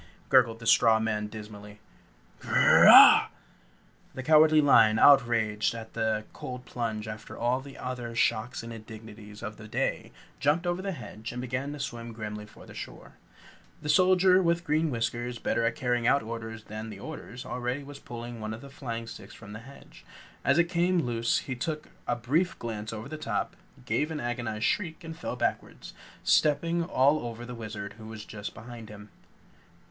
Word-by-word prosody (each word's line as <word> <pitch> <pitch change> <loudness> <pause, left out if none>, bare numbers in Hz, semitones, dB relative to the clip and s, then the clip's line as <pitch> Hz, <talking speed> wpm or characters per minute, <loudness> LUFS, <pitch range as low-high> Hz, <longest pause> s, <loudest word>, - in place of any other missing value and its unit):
gurgled 120 -4 +4
the 115 - -11
straw 115 -1 +5
man 105 -1 -1
dismally. 105 -1 -10 0.6
"Grrr - - +5
rah!" - - +10 0.9
The 130 - -5
Cowardly 155 +1 +6
Lion, 115 -7 +5
outraged 115 -5 +4
at 115 -1 -9
the 110 -1 -1
cold 125 0 -7
plunge 115 -3 -4
after 110 +1 -8
all 125 +3 0
the 135 0 -12
other 125 -2 -5
shocks 115 0 0
and 115 0 -7
indignities 110 -1 -11
of 105 -1 -6
the 110 - -11
day, - - -2 0.3
jumped 150 +5 +1
over 175 +1 -1
the 195 0 -3
hedge 115 -6 -8
and 120 - -6
began 130 +3 -3
to 150 - -8
swim 115 -3 -5
grimly 105 -1 -6
for 105 - -15
the - - -13
shore. - - -9 0.7
The 150 - -4
Soldier 185 +1 +5
with 170 -1 +1
Green 155 +1 +1
Whiskers, 120 0 -3
better 115 - -1
at 115 - 0
carrying 120 -2 0
out 140 - +3
orders 110 0 -7
than 110 +1 -7
the 100 -3 -9
others, 130 -2 -8
already 125 +2 -3
was 140 0 -10
pulling 120 -1 -8
one 110 0 -4
of 115 - -12
the 140 - -12
flying 115 -4 -5
sticks 115 - -11
from 105 -2 -11
the 105 - -7
hedge. 135 +4 -15 0.4
As 140 - +3
it 170 - +6
came 175 0 +1
loose 115 -1 0
he 130 - -3
took 150 +5 -4 0.2
a 120 - +1
brief 145 +10 0
glance 110 -2 -5
over 110 +2 -6
the 155 +2 -7
top, - - -3 0.3
gave 150 - 0
an 160 -2 -4
agonized 120 -4 -3
shriek 170 -4 -1
and 165 0 -7
fell 165 -6 -5
backward, - - -2 0.5
stepping 165 +3 +2
all 145 -3 +3
over 120 -1 -6
the 125 - -7
Wizard 105 -3 -7
who 110 - -10
was 110 -1 -8
just 105 -1 -7
behind 115 -1 -10
him. 105 0 -12
120 Hz, 180 wpm, -28 LUFS, 110-145 Hz, 0.9 s, rah